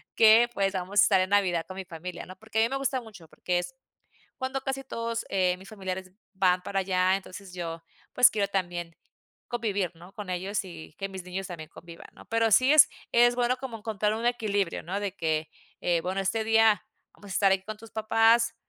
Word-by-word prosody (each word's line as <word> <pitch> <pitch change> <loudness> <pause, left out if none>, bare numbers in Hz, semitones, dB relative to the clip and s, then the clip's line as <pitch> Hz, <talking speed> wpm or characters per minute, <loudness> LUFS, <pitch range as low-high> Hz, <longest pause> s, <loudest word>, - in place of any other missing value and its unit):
que 225 +2 +7
pues, 195 -1 0
vamos 190 +2 -1
a - - +7
estar 190 -3 +4
en 185 - -1
Navidad 180 -5 +2
con 185 - -8
mi 190 - -5
familia, 175 0 -7
¿no? 185 - -11
Porque, 220 +1 -3
a - - +5
mí 230 - +1
me 270 - -1
gusta 270 -1 -1
mucho, 210 -8 -13
porque, 180 -1 -1
es 265 +9 -6 0.6
cuando 260 0 -3
casi 270 0 -3
todos, 230 -2 -3
eh, 185 -2 +2
mis 190 +3 -13
familiares 190 -3 -6 0.2
van 185 -1 +2
para 195 -1 -1
allá, 185 0 +2
entonces 195 -1 -9
yo, 165 -2 -5 0.3
pues, 250 - +7
quiero 205 -2 0
también 175 -3 -3 0.5
convivir, 205 -7 -1
¿no? 175 +3 -15
con 205 -3 -7
ellos, 190 +3 -2
y 165 -3 -11
que 195 0 -4
mis 190 -2 -7
niños 185 +1 -5
también 160 -3 -8
convivan, 170 0 -12
¿no? - - -15
Pero 225 0 +1
sí, 255 +6 +5
es 310 - +8 0.2
es 240 +1 +5
bueno 250 +1 +1
como 255 -4 -6
encontrar 210 -1 -1
un 230 +2 -4
equilibrio, 205 -6 0
¿no? 190 +5 -3
De 200 -2 -3
que, 160 -2 -1 0.3
eh, 175 -1 +2
bueno, 190 +2 -2
este 220 +3 0
día 225 -1 +4 0.3
vamos 205 - -15
a - - -3
estar 195 -1 +4
ahí 190 0 +2
con 215 +2 -6
tus 225 +1 -14
papás, 225 +1 +3
195 Hz, 215 wpm, -27 LUFS, 180-225 Hz, 0.6 s, es